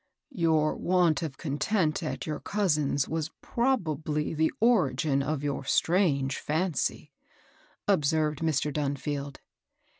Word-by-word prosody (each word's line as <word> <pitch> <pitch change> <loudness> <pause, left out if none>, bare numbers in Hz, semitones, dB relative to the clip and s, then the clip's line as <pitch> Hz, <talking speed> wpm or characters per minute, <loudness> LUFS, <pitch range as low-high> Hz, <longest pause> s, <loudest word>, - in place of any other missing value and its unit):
"Your 160 -6 +2
want 175 -3 +2
of 150 -5 -5
content 155 +3 0
at 155 - -4
your 155 -2 -3
cousin's 150 -9 0
was 160 -1 -2
probably 160 - -1
the 160 0 +1
origin 155 - +2
of 145 0 -2
your 140 -1 -2
strange 145 -3 +1
fimcy," 160 -1 -1 0.8
ob 150 - +3
served 150 0 +1
Mr. 150 -2 0
Dunfield. 145 -1 -3
155 Hz, 115 wpm, -28 LUFS, 145-170 Hz, 0.8 s, ob